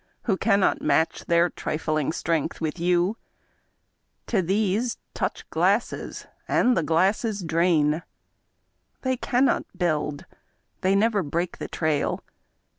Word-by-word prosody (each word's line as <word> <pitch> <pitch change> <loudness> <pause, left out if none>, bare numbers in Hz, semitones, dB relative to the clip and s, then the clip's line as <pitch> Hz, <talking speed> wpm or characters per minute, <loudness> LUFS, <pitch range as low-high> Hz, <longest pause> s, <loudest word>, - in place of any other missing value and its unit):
Who 205 - +1
cannot 200 0 +2
match 160 - +1
their 170 0 +4
trifling 155 -1 -1
strength 165 -1 -1
with 160 +1 -3
you; 180 +4 +2 1.1
To 210 -5 +1
these, 205 +5 0 0.2
touch - - -3
glasses - - 0
— - - -40
^and 250 - +4
the 170 - +2
glasses 190 +6 +1
drain! 160 -2 +2 1.0
They 260 -1 +1
cannot 250 +2 0
build, 150 -5 -1 0.6
they 190 +1 +3
never 210 0 +3
break 170 +2 -3
the - - -4
trail. 155 -3 -1
175 Hz, 115 wpm, -25 LUFS, 160-205 Hz, 1.1 s, their